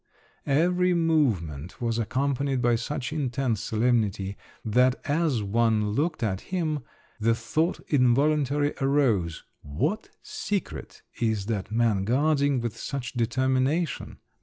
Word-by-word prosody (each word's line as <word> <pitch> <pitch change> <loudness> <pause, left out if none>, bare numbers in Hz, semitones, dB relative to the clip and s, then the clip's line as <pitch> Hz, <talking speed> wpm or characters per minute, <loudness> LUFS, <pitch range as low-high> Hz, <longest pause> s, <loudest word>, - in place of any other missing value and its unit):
Every 180 +5 +2
movement 105 - 0
was 115 -1 -1
accompanied 135 +3 0
by 120 -1 +3
such 135 +4 -3
intense 130 -6 -1
solemnity 110 -4 0 0.3
that 125 +4 +3
as 145 -6 +1
one 110 0 +1
looked 150 +4 -1
at 95 -3 -1
him 160 -5 -2 0.4
the 115 +1 +2
thought 155 +10 -1
involuntarily 145 +2 +2
arose, 120 - +1 0.2
"What 145 - -2
secret 200 -2 -4 0.2
is 110 -4 0
that 105 -2 -3
man 110 -4 +2
guarding 140 +2 +2
with 115 -1 -4
such 125 0 -5
determination?" 130 +6 0
125 Hz, 110 wpm, -26 LUFS, 110-145 Hz, 0.4 s, by